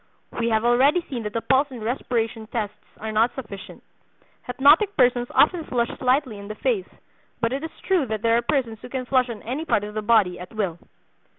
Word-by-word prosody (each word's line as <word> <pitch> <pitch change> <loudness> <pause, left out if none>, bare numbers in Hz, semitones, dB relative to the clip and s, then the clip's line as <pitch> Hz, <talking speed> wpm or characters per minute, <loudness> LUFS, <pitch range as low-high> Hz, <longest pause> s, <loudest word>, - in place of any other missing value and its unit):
We 230 0 +1
have 220 0 +1
already 275 +8 +4
seen 245 -3 -3
that 210 - -4
the 230 - -1
pulse 270 +3 +3
and 245 -5 -8
respiration 225 -2 -2
tests 215 -3 -3 0.3
are 220 0 -4
not 225 +3 +2
sufficient. 205 -7 -9 0.6
Hypnotic 295 +11 +4
persons 245 -1 +3
often 330 +2 +3
flush 240 -3 -1
slightly 255 -4 +1
in 200 - -9
the 215 - -6
face; 435 - -1 0.5
but 230 +1 0
it 275 +3 -3
is 320 - -4 0.2
true 360 -8 +2
that 215 0 -4
there 230 0 +4
are 235 - +3
persons 235 -4 -1
who - - -10
can 255 0 -4
flush 255 -1 +2
on 225 -3 -7
any 260 +7 -3
part 255 -10 +1
of 210 0 -6
the 215 - -2
body 210 -5 +3
at 180 +4 -10
will. 190 -6 -2
240 Hz, 210 wpm, -24 LUFS, 220-265 Hz, 0.6 s, already